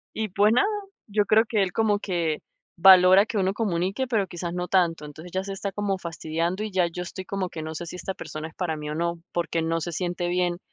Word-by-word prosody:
Y, 220 -1 -2
pues, 205 +4 +3
nada, 400 - +4 0.4
yo 205 0 +1
creo 220 +2 +5
que 215 -3 +1
él 190 -2 +1
como 215 -2 +2
que 170 -6 -1 0.4
valora 185 +2 +8
que 220 - -4
uno 190 0 +1
comunique, 200 +3 -1
pero 220 -6 +1
quizás 175 -1 -5
no 180 0 -3
tanto. 170 -5 +2
Entonces, 155 +4 -10
ya 190 0 -1
se 195 0 -5
está 195 0 -4
como 200 -1 -1
fastidiando 170 +2 -3
y 215 - -4
ya 185 -2 +2
yo 180 +1 -5
estoy 185 +1 -7
como 195 -2 -3
que 160 - -6
no 160 0 -6
sé 170 - -5
si 170 - -7
esta 190 +1 -4
persona 155 -4 -7
es 160 - -22
para 165 -4 -2
mí 150 0 -6
o 150 - -3
no, 170 +1 -2
porque 170 -1 -1
no 165 +1 -1
se 175 - -3
siente 175 +1 -2
bien 175 0 0
180 Hz, 245 wpm, -25 LUFS, 170-195 Hz, 0.4 s, valora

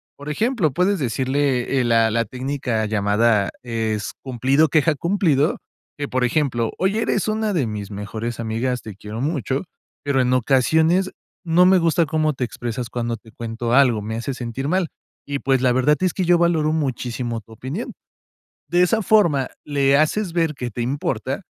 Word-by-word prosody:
Por 145 +1 -8
ejemplo, 210 - +1
puedes 185 +7 +1
decirle, 130 +1 0
eh, - - +2
la 115 -1 +3
la 115 +1 +1
técnica 125 -2 -2
llamada 105 0 +2
es 110 -3 -2
cumplido, 135 +4 +2
queja, 155 +1 +3
cumplido, 165 -3 +1 0.4
que, 145 -1 -3
por 130 -1 -1
ejemplo: 120 -3 0
"Oye, 200 +4 +1
eres - - 0
una 215 0 0
de 160 -8 +1
mis 105 -2 -5
mejores 110 +3 -5
amigas, 115 +2 -2
te 110 -3 -8
quiero 105 +3 -7
mucho, 140 0 -1 0.4
pero 140 -2 +2
en 125 0 +1
ocasiones 160 - +2 0.3
no 175 +1 +4
me 185 0 +5
gusta 165 0 +2
cómo 155 +1 +1
te 130 - -3
expresas 120 +1 -5
cuando 120 -2 -3
te 110 +1 -18
cuento 115 +1 -4
algo, 125 -5 +4
me 110 +2 -4
hace 120 +4 -3
sentir 125 +2 -4
mal, 185 0 +1 0.4
y, 140 0 -3
pues, 135 -2 +1
la 130 -1 +3
verdad 130 +4 +3
es 185 -2 +1
que 190 - -1
yo 175 0 +5
valoro 165 -3 +2
muchísimo 120 -5 -2
tu 110 - -21
opinión". 130 - -5 0.8
De 175 0 +3
esa 220 +5 +2
forma 170 -10 +3 0.2
le 140 -1 +2
haces 170 +5 +1
ver 165 -3 +1
que 125 -1 -4
te 120 - -4
importa, 130 +5 -2
135 Hz, 175 wpm, -21 LUFS, 115-160 Hz, 0.8 s, me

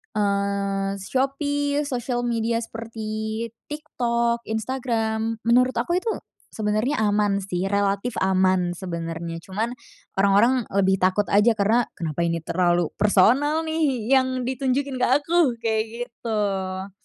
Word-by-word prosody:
eee, 200 -1 0
Shopee, 285 +4 0
sosial 245 -1 -2
media 230 0 0
seperti 220 0 -5 0.2
TikTok, 235 -5 -1
Instagram. 225 -1 -2
Menurut 250 +2 +4
aku 345 +8 0
itu 445 +5 -1 0.4
sebenernya 215 +6 0
aman 205 -1 +2
sih, 185 -1 -2
relatif 200 +3 0
aman 185 -2 +2
sebenernya. 165 -2 -5
Cuman, 215 +7 -3 0.5
orang-orang 210 +5 +4
lebih 190 -1 +3
takut 185 +3 +2
aja, 210 +3 +5
karena, 220 +4 +2
"Kenapa 165 0 -3
ini 165 0 0
terlalu 175 -1 +1
personal 255 - +4
nih, 275 -7 0
yang 260 -1 +2
ditunjukin 260 +1 -1
ke - - +3
aku?" 340 +4 +1 0.2
kayak 220 -1 +1 0.3
gitu. 195 -4 -3
220 Hz, 115 wpm, -24 LUFS, 195-250 Hz, 0.5 s, aja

